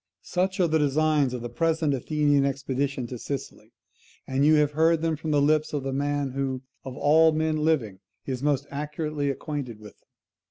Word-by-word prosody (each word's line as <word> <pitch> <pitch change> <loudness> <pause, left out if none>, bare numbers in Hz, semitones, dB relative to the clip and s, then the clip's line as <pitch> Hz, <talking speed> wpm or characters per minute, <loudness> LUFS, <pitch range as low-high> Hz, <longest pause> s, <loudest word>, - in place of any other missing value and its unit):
"Such 185 +2 -1
are 180 - +4
the 160 0 +2
designs 150 -1 +2
of 125 -2 -5
the - - -3
present 160 -1 0
Athenian 145 +1 +1
expedition 135 -1 -2
to 120 0 -7
Sicily, 140 +2 -6 0.5
and 135 +1 0
you 155 +1 +6
have 150 -1 +3
heard 160 +2 +2
them 165 -1 +1
from 155 +1 -6
the 150 -1 +3
lips 155 +1 +2
of 145 -2 -2
the 135 0 -3
man 145 0 -1
who, 135 -1 -3 0.2
of 130 -1 -8
all 160 +2 +5
men 155 0 0
living, 145 -11 0 0.3
is 130 -2 -4
most 145 -1 +1
accurately 150 0 -3
acquainted 140 -4 -4
with 105 -1 -14
them. - - -41
145 Hz, 190 wpm, -26 LUFS, 135-155 Hz, 0.5 s, you